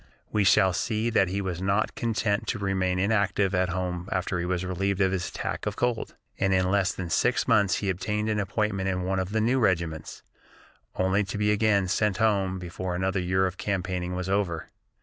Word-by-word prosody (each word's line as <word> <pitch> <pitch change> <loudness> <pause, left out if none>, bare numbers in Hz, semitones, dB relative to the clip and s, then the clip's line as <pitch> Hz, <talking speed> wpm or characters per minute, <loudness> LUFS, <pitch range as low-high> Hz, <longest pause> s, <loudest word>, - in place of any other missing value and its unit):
We 105 - +2
shall 95 -1 +5
see 110 +4 -1
that 95 -4 +3
he 95 +3 -2
was 90 -2 -3
not 100 +3 +1
content 110 -3 -1
to 120 - -1
remain 95 -2 0
inactive 100 0 +1
at 90 -1 +1
home 90 0 -3
after 95 -1 -1
he 85 - -2
was 90 0 -1
relieved 95 +1 -1
of 95 -2 +3
his 95 -2 -2
attack - - -4
of - - -2
cold, 120 -2 -1 0.2
and 95 0 +2
in 95 0 +2
less 100 -1 +2
than 90 -3 -6
six - - +2
months 100 -2 +4
he 100 - -2
obtained 105 +3 -2
an 105 -1 0
appointment 100 -1 -1
in 90 -1 -1
one 95 +1 0
of 95 0 -2
the 110 0 +1
new 125 +4 +2
regiments, 85 -7 -1 0.7
only 95 +2 +2
to 95 +2 -5
be 105 0 +2
again 105 -2 +2
sent 100 +1 +1
home 100 -4 +1
before 90 0 -4
another 95 +1 0
year 95 +1 +1
of 95 0 -3
campaigning 90 -2 -2
was 90 0 -3
over. 95 -5 -1
95 Hz, 205 wpm, -27 LUFS, 90-105 Hz, 0.7 s, shall